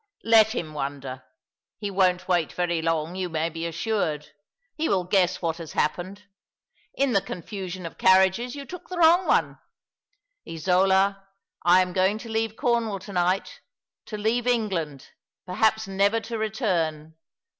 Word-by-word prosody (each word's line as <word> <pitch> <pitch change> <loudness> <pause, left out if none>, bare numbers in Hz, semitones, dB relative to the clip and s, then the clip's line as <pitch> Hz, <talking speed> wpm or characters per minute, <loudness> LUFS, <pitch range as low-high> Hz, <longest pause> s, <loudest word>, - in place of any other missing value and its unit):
" - - -40
Let 220 +1 +6
him 155 -8 -4
wonder. 135 -3 -5 0.6
He 205 -2 -4
won't 185 -1 +2
wait 175 -3 +1
very 175 -2 -1
long, 165 0 -1
you 185 -1 -3
may 160 0 -1
be 165 +1 -4
assured. 165 -4 -2 0.4
He 320 +1 -2
will 185 -2 +2
guess 180 0 +1
what 165 -1 -1
has 165 -3 -8
happened. 185 +6 -2 0.7
In 275 -1 +1
the 195 - +3
con 175 - -7
fusion 185 -4 -6
of 165 - -9
carriages 190 +7 +4
you 280 -1 -7
took 360 +5 -10
the 365 - -5
wrong 345 +2 +5
one. - - +1 0.9
Isola, 190 +4 +2 0.4
I 180 +2 +6
am 180 -1 -6
going 190 +3 +2
to 230 +1 -9
leave 220 0 -1
Cornwall 235 -5 0
to 195 +2 -10
night— 180 +2 0 0.5
to 215 - -5
leave 225 +3 0
England— 185 - -1 0.3
perhaps 220 +3 +1
never 200 +3 +2
to 230 +1 -6
return. 170 - -1
190 Hz, 155 wpm, -25 LUFS, 170-220 Hz, 0.9 s, Let